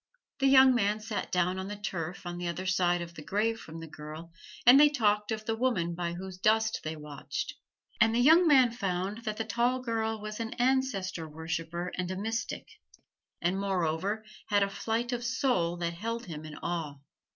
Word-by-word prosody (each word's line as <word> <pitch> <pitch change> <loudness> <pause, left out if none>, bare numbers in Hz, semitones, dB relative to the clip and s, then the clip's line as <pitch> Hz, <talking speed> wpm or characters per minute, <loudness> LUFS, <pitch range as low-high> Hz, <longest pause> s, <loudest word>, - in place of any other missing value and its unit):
The 270 - +3
young 265 -1 +8
man 210 -2 +1
sat 215 -1 -4
down 180 +1 +1
on 190 - -4
the 205 - -5
turf 180 -3 -5
on 175 0 -5
the 175 - -3
other 175 +2 -3
side 175 -2 +2
of 170 0 -10
the 155 - -9
grave 220 +7 0
from 160 -4 -9
the 165 - -8
girl, 155 +2 -9 0.3
and 250 +3 +9
they 295 0 +8
talked 210 -7 +1
of 215 -1 -3
the 225 - 0
woman 225 -9 0
by 170 0 -3
whose 185 +1 -7
dust 220 +2 +2
they 155 +1 -3
watched: 150 -2 -5 0.5
and 230 -1 +4
the - - +3
young 325 +7 +6
man 260 -5 +6
found 195 -2 -2
that 215 -1 -2
the 225 - -2
tall 245 +2 +1
girl 225 -3 -2
was 215 +1 -6
an 225 0 -4
Ancestor 230 -10 0
Worshiper 165 +3 -4
and 180 -1 -1
a 185 - -3
mystic, 225 +4 -3 0.8
and 180 +3 +1
moreover 195 +2 -1 0.2
had 205 -1 +3
a 200 - -1
flight 230 +4 -2
of 245 -1 -2
soul 230 -8 +1
that 170 -1 -2
held 230 +6 -4
him 155 -4 -7
in 155 -1 -8
awe. 165 -4 -2
200 Hz, 195 wpm, -30 LUFS, 170-230 Hz, 0.8 s, and